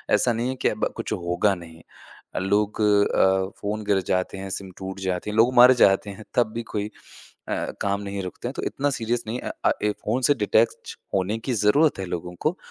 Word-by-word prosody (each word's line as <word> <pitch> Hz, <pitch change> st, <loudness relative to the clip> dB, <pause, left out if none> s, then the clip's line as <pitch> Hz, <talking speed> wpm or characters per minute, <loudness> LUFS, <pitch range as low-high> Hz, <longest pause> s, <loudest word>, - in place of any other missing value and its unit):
ऐसा 120 Hz, -, +2 dB
नहीं 120 Hz, +2 st, -1 dB
है 130 Hz, -, -2 dB
कि -, -, +3 dB
अब -, -, -1 dB
कुछ -, -, -3 dB
होगा 90 Hz, +3 st, +1 dB
नहीं। 80 Hz, -2 st, -12 dB, 0.5 s
अ, -, -, 0 dB
लोग 100 Hz, +3 st, 0 dB
अ, 95 Hz, -2 st, +3 dB
फ़ोन 105 Hz, +1 st, -3 dB
गिर 100 Hz, -2 st, +2 dB
जाते 90 Hz, +1 st, 0 dB
हैं 95 Hz, 0 st, -6 dB
सिम 95 Hz, 0 st, -5 dB
टूट 95 Hz, 0 st, -6 dB
जाती 95 Hz, +1 st, -2 dB
है 105 Hz, -, -4 dB
लोग 115 Hz, +3 st, +4 dB
मर 125 Hz, +1 st, +9 dB
जाते 95 Hz, +1 st, +3 dB
हैं 100 Hz, +2 st, -9 dB
तब 120 Hz, -3 st, +2 dB
भी 115 Hz, -, -3 dB
कोई 105 Hz, -1 st, -1 dB, 0.6 s
अ, -, -, -2 dB
काम 100 Hz, 0 st, 0 dB
नहीं 100 Hz, -1 st, -4 dB
रुकते 90 Hz, +6 st, -6 dB
हैं 125 Hz, -, -4 dB
तो -, -, -5 dB
इतना 145 Hz, +1 st, -1 dB
सीरियस 120 Hz, +1 st, -1 dB
नहीं 115 Hz, +3 st, -3 dB
अ -, -, -4 dB
अ, -, -, +5 dB
एक 105 Hz, 0 st, +1 dB
फ़ोन 120 Hz, +5 st, 0 dB
से 145 Hz, -, +5 dB
डिटैच 115 Hz, -1 st, +1 dB, 0.2 s
होने 100 Hz, +3 st, 0 dB
की 125 Hz, +3 st, -3 dB
ज़रूरत 115 Hz, +8 st, +3 dB
है 95 Hz, -, -3 dB
लोगों 90 Hz, 0 st, -5 dB
को, 165 Hz, +5 st, 0 dB
105 Hz, 220 wpm, -24 LUFS, 95-115 Hz, 0.6 s, मर